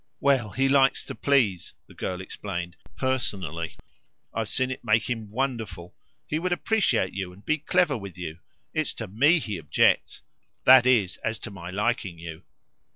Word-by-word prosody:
"Well, 135 Hz, -6 st, +2 dB
he 135 Hz, +5 st, +1 dB
likes 135 Hz, -1 st, +3 dB
to -, -, -6 dB
please," 115 Hz, -, +1 dB
the -, -, -16 dB
girl 90 Hz, -1 st, -4 dB
explained 90 Hz, -3 st, -5 dB, 0.2 s
"personally. 95 Hz, -, -2 dB, 0.6 s
I've 115 Hz, -1 st, -2 dB
seen 130 Hz, 0 st, 0 dB
it 130 Hz, -, -6 dB
make 110 Hz, -1 st, +2 dB
him 115 Hz, -4 st, -3 dB
wonderful. 110 Hz, -8 st, -3 dB, 0.3 s
He 155 Hz, -, -1 dB
would 180 Hz, +2 st, -1 dB
appreciate 185 Hz, -, +1 dB
you 95 Hz, -2 st, -4 dB
and 95 Hz, +3 st, -17 dB
be 155 Hz, +1 st, +1 dB
clever 170 Hz, 0 st, +2 dB
with 100 Hz, -6 st, -7 dB
you. 85 Hz, -2 st, -6 dB, 0.3 s
It's 155 Hz, -2 st, -1 dB
to 110 Hz, -, -5 dB
ME 140 Hz, -, +4 dB
he 105 Hz, -, -3 dB
objects 75 Hz, -3 st, +2 dB, 0.4 s
that 130 Hz, -1 st, +8 dB
is 110 Hz, -8 st, +3 dB
as 110 Hz, 0 st, -2 dB
to 110 Hz, -, -6 dB
my 90 Hz, -3 st, -8 dB
liking 100 Hz, -2 st, -1 dB
you." 80 Hz, 0 st, -8 dB
110 Hz, 165 wpm, -26 LUFS, 90-135 Hz, 0.6 s, that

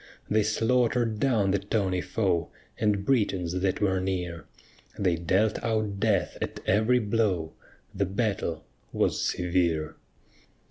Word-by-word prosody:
They 110 Hz, +1 st, +4 dB
slaughter'd 115 Hz, +1 st, +1 dB
down 110 Hz, -7 st, +2 dB
the 100 Hz, -, +2 dB
tawny 100 Hz, -2 st, -1 dB
foe, 90 Hz, -7 st, 0 dB, 0.3 s
And 105 Hz, -2 st, +1 dB
Britons 95 Hz, -8 st, +1 dB
that 95 Hz, -1 st, 0 dB
were 95 Hz, -2 st, +2 dB
near; 90 Hz, -3 st, -3 dB, 0.5 s
They 90 Hz, -4 st, +2 dB
dealt 95 Hz, +6 st, +1 dB
out 110 Hz, -3 st, -1 dB
death 105 Hz, -1 st, +1 dB
at -, -, -4 dB
every 110 Hz, +5 st, +3 dB
blow, 105 Hz, -7 st, 0 dB, 0.4 s
The 100 Hz, 0 st, 0 dB
battle 95 Hz, -5 st, -2 dB, 0.3 s
was -, -, 0 dB
severe. 85 Hz, -3 st, 0 dB
100 Hz, 125 wpm, -27 LUFS, 90-110 Hz, 0.5 s, They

